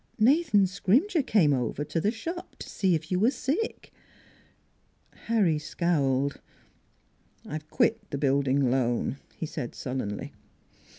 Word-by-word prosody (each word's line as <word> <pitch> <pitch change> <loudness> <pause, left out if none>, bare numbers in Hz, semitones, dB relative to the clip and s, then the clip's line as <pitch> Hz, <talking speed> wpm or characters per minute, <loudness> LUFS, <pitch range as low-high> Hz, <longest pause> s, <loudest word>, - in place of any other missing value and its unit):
Nathan 250 - +4
Scrimger 250 - +2
came 185 - +3
over 125 +2 -1
to 165 +2 -2
the 205 - +2
shop 330 +11 -6
to - - -8
see 185 -3 +1
if 160 +2 -5
you 180 - +2
were 220 +5 +4
sick." 300 +10 -3 1.3
Harry 200 -9 +2
scowled. 140 -4 0 0.5
" - - -37
I've 155 0 -6
quit 230 +2 +1
the 140 - -3
Building 140 -1 +2
Loan," 125 0 0 0.2
he - - -3
said 145 -5 -6
sul 130 0 -4
lenly. 105 -5 -4
165 Hz, 135 wpm, -27 LUFS, 140-225 Hz, 1.3 s, Nathan